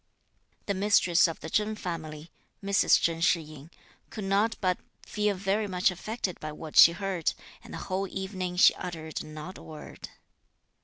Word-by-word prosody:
The 200 - -1
mistress 190 -3 +4
of 165 - -6
the 160 - -6
Chen 215 0 +1
family 160 -4 -6 0.3
(Mrs. 200 0 +4
Chen 165 -1 0
Shih 170 0 +4
yin) 155 -1 -12 0.4
could 215 - -7
not 200 +3 +1
but 185 -2 0 0.3
feel 210 -1 0
very 195 +3 -1
much 185 0 +2
affected 190 0 -4
by 155 - -5
what 155 0 -9
she 170 - +9
heard, 185 -2 -2 0.3
and - - -13
the - - -6
whole 195 +1 -2
evening 190 -2 -4
she 180 - +7
uttered 160 -3 -6
not 155 +4 -9
a - - -13
word. 155 -1 -10
180 Hz, 165 wpm, -28 LUFS, 165-195 Hz, 0.4 s, she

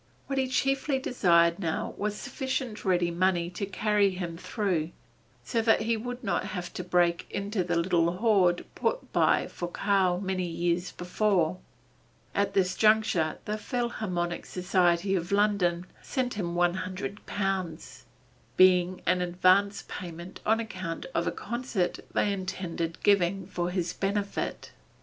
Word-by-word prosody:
What 275 -1 -1
he 260 - +1
chiefly 270 +2 +1
desired 170 -10 +3
now 165 -4 -2
was 210 0 -2
sufficient 260 -2 -4
ready 175 -3 +2
money 175 0 +1
to 195 +2 -4
carry 205 +1 +2
him 180 -3 -4
through, 180 -4 -1 0.5
so 230 - 0
that 225 0 +3
he 230 +1 +1
would 245 +3 -5
not 200 - 0
have 180 -3 -5
to 180 - -4
break 175 -1 +1
into 200 -1 -2
the 175 0 -1
little 170 -1 +2
hoard 185 -3 +3
put - - -2
by - - +3
for 175 - -5
Karl 190 -2 +1
many 185 -2 -2
years 175 +1 -1
before. 180 -2 0 0.7
At 200 0 0
this 185 -1 +2
juncture 215 -7 +3
the 210 +1 -2
Philharmonic 210 -8 -2
Society 180 0 +1
of 175 -1 -1
London 200 -4 +2 0.2
sent 255 -2 -2
him 175 -5 -3
one 175 0 +3
hundred 185 +2 -5
pounds, 185 -9 -3 0.5
being 185 0 +4
an 180 0 +2
advance 185 +3 +3
payment 175 +1 -8
on 220 +1 +4
account 185 -7 -5
of - - 0
a - - +1
concert 235 -7 -2
they 205 - +1
intended 175 -3 -4
giving 195 -2 +3
for 175 -2 -2
his 180 -1 -2
benefit. 200 +1 -2
185 Hz, 145 wpm, -28 LUFS, 175-210 Hz, 0.7 s, being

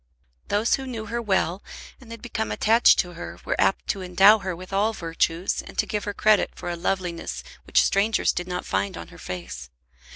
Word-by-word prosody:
Those 210 +3 +1
who 265 -1 -1
knew 225 -4 -5
her 235 +3 -3
well, 190 -3 0 0.4
and 245 - -16
had 230 0 -9
become 220 -2 -3
attached 225 +2 +5
to 175 -1 -1
her, 170 - -8
were - - 0
apt - - +2
to 195 - -1
endow 195 +4 +6
her 190 -3 -4
with 185 +3 -11
all 210 +3 +2
virtues, 165 0 -1
and - - -13
to - - +2
give 210 -1 -3
her 205 - -3
credit 215 -1 +3
for 175 - -5
a - - -3
loveliness 175 -1 -3 0.2
which - - +4
strangers 205 +3 +2
did 180 - -4
not 180 0 -4
find 95 -1 -2
on 85 -1 -9
her - - -14
face. 85 -8 -7
195 Hz, 205 wpm, -24 LUFS, 175-220 Hz, 0.4 s, endow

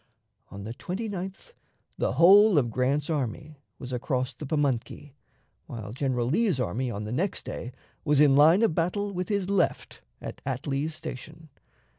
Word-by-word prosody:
On 100 0 -9
the 110 +3 -6
29th 195 - -6 0.4
the - - -1
whole 200 +2 +7
of 120 -5 +2
Grant's 135 +4 0
army 145 0 -3 0.2
was 125 0 -7
across 130 +1 -2
the 150 - -8
Pamunkey, 145 -1 -2 0.5
while 110 -3 -7
General 130 -2 -1
Lee's 180 - +1
army 125 +1 -1
on 105 -2 -4
the 105 - -5
next 175 +10 -2
day 120 - -6 0.3
was 150 -3 +2
in 145 -2 +6
line 160 +9 +6
of 220 - +3
battle 200 +5 -1
with 180 +1 -3
his 200 -3 0
left 195 -3 -1 0.2
at - - -8
Atlee's 140 +3 -2
Station. 155 +3 -9
145 Hz, 155 wpm, -27 LUFS, 125-180 Hz, 0.5 s, whole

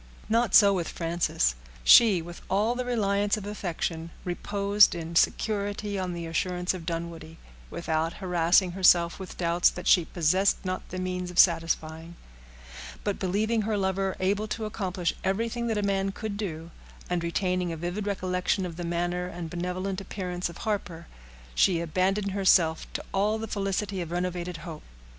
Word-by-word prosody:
Not 230 0 +2
so 200 -1 +8
with 175 -3 -2
Frances. 165 - 0 0.3
She, 205 -8 +7
with 175 +1 -10
all 210 +5 +2
the 250 0 -3
reliance 205 -4 +1
of 205 - -7
affection, 170 -5 -4 0.2
reposed 200 +2 +3
in 170 0 -6
security 205 +1 0
on 185 -1 -3
the 170 -1 -5
assurance 180 +2 -1
of 175 -3 -8
Dunwoodie, 165 -1 -5 0.3
without 160 - -1
harassing 180 0 +2
herself 175 -2 +4
with 190 - -8
doubts 170 0 +3
that 180 - -8
she 175 -3 +5
possessed 185 +4 +2
not 185 0 -4
the 185 - -6
means 180 0 -3
of 180 - -9
satisfying; 165 -1 +2 0.9
but - - -2
believing 215 +5 0
her 215 0 -1
lover 190 0 0
able 200 +3 0
to 220 +1 -3
accomplish 190 -5 -2
everything 230 +4 -1
that 210 -3 0
man 195 0 0
could 215 +1 -5
do, 170 -5 -5 0.4
and 175 -1 -1
retaining 180 +1 -1
a 165 - -5
vivid 175 +5 -4
recollection 185 -1 -1
of 170 -2 -7
the 175 - -4
manner 175 +1 -1
and 170 -2 -7
benevolent 185 +2 -3
appearance 180 -2 -4
of 170 - -10
Harper, 195 -6 -3 0.5
she 170 - +3
abandoned 185 +5 0
herself 185 -4 +3
to - - -4
all 210 +3 +1
the 225 0 -5
felicity 195 -1 -2
of 170 - -5
renovated 175 0 -3
hope. 160 -3 -7
185 Hz, 160 wpm, -27 LUFS, 170-200 Hz, 0.9 s, so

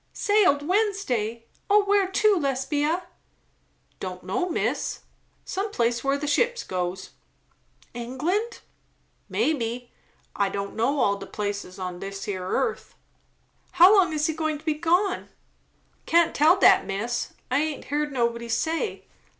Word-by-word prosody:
"Sailed 370 -9 +2
Wednesday? 300 - 0 0.2
O 410 +1 +5
where 400 -1 +3
to, 415 +2 +3
Lesbia?" 295 +3 0 1.0
"Don' 185 -1 -5
know, 195 - -1
miss; 330 - -2 0.4
some 395 +3 -3
place 235 - 0
where 275 +1 +1
the 295 - -4
ships 480 +12 +1
goes." 180 0 -4 0.8
"England?" 310 - -2 0.7
"Mebbe. 245 -4 -1 0.5
I 200 -1 +1
doesn't 200 0 -5
know 265 +6 +1
all 200 -2 +2
de 200 - -9
places 205 -3 -4
on 180 -2 -5
dis 195 +1 -6
yere 185 -2 -3
arth." 450 - -2 0.8
"How 370 +5 +8
long 370 -4 +4
is 305 -1 0
he 315 - 0
going 315 -1 -2
to 300 - -18
be 310 - +2
gone?" 345 +6 0 0.8
"Can't 335 0 +4
tell 315 +6 +5
dat, - - +5
miss. 210 +5 -3 0.2
I 255 - +3
haint 305 -1 -3
heerd 295 +2 -1
nobody 235 -2 -1
say. 320 - -1
290 Hz, 135 wpm, -25 LUFS, 230-355 Hz, 1.0 s, How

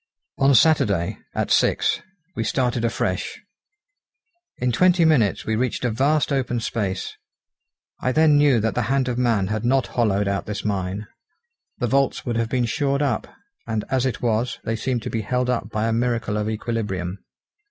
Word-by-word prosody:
On 135 0 +5
Saturday, 105 - +3 0.2
at - - -1
six, - - +2 0.3
we - - -1
started 125 -6 0
afresh. 95 -5 -2 1.2
In 125 0 0
twenty 180 +6 +4
minutes 120 - +2
we 110 - 0
reached 125 +1 -1
a 120 - +1
vast 140 +5 +1
open 125 -3 0
space; 100 -5 -3 0.9
I 130 - 0
then 155 +2 +4
knew 145 -4 +4
that 110 +1 0
the 125 - 0
hand 135 -1 +1
of 125 -1 -1
man 110 -6 +1
had 110 0 -2
not 130 +2 +2
hollowed 105 -4 +1
out 100 0 -2
this 105 0 -4
mine; 100 0 -2 0.7
the 125 - -1
vaults 135 +3 +1
would 120 - -2
have 115 -1 0
been 125 -1 +1
shored 140 +4 0
up, 140 - -1 0.4
and, 110 -2 -1
as 130 -1 +2
it 125 -1 -4
was, 115 +1 0
they 115 - -1
seemed 120 +1 -2
to - - -4
be 115 - -1
held 125 +4 0
up 115 -4 -2
by 110 0 -1
a 115 - +1
miracle 115 -2 0
of 105 0 -1
equilibrium. 105 -5 -3
120 Hz, 175 wpm, -23 LUFS, 105-130 Hz, 1.2 s, On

